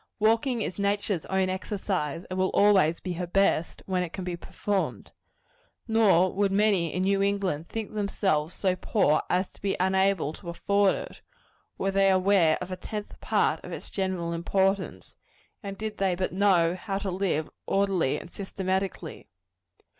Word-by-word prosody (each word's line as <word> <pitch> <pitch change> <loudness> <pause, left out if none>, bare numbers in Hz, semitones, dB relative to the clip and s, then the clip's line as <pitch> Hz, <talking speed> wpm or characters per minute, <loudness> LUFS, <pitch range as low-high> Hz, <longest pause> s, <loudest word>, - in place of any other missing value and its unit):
Walking 225 +3 +2
is 180 - -5
nature's 200 -3 -1
own 190 0 +1
exercise; 185 -4 -3
and 185 0 -4
will 185 - +2
always 190 -6 +4
be 180 - -4
her 175 +1 -4
best, 180 -2 +1
when 185 -1 0
it 175 -2 -4
can 190 - -5
be 180 -1 -3
performed. 195 +3 -3 0.8
Nor 200 -5 +4
would 200 0 +1
many 195 -5 +2
in 185 - -1
New 195 +1 +2
England 195 -6 -1
think 220 -2 -5
themselves 190 -6 0
so 185 -2 +1
poor 180 -5 +2
as 185 +1 0
to - - -22
be 195 -1 -1
unable 190 -4 +2
to 170 +1 -9
afford 200 +3 +2
it, - - -8 0.6
were 195 - 0
they 195 0 +4
aware 185 -4 +4
of 180 +1 -5
a 185 - -4
tenth 210 +2 -7
part - - +1
of - - -8
its - - -7
general 185 -3 -2
importance, 190 +3 -1 0.4
and 200 -3 -6
did 215 0 -5
they 190 -2 +2
but 185 0 -2
know 185 -4 +3
how 195 +2 -4
to 195 -1 -3
live 180 -5 -1 0.2
orderly 195 -8 +1
and 170 - -10
systematically. 190 -1 -3
190 Hz, 165 wpm, -27 LUFS, 180-200 Hz, 0.8 s, always